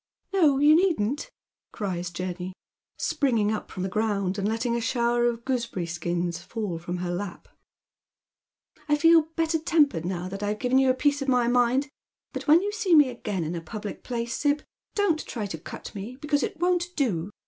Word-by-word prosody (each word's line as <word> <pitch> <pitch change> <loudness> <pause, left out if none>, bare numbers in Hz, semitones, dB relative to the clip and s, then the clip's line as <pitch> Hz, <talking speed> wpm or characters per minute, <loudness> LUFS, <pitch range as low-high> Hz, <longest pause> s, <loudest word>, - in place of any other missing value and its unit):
" - - -43
No, 310 -8 +4
you 295 +2 +6
needn't," 315 - +1 0.4
cries 180 -4 -3
Jenny, 180 +1 -5 0.4
springing 230 -7 +1
up 215 - -4
fi - - -12
om 185 - -2
the - - 0
ground 200 -2 0
and 200 - 0
letting 230 +2 0
a 235 - -1
shower 240 0 +1
of 235 -1 -3
gooseberry 235 -9 -1
skins 170 0 -2
fall 190 -1 -4
fi 170 - -13
om - - -2
her 175 0 -3
lap. 180 +1 -5 0.8
" 305 - -35
I 295 - +5
feel 330 0 +5
better 325 0 +1
tempered 295 - +2
now 180 0 -3
that 195 +2 -6
I've 205 +1 -1
given 250 +3 +2
you 265 -1 +4
a 255 - +3
piece 285 +2 +1
of 275 - -3
my 250 -2 +3
mind_ 245 +3 +2 0.5
but - - -5
when 320 +5 +6
you 410 - -1
see 415 -5 +2
me 295 -4 +7
again 210 -7 -3
in 160 +2 -3
a 170 - -4
public 205 +5 -7
place. 235 -1 -3
Sib, 295 0 +1 0.3
don't 385 -7 +2
you - - -12
try 220 -4 -3
to 165 -5 -5
cut - - -9
me, 210 +5 -6
because 290 +1 0
it 410 -5 -3
won't 350 +1 +1
do. 200 - 0
235 Hz, 205 wpm, -26 LUFS, 190-295 Hz, 0.8 s, me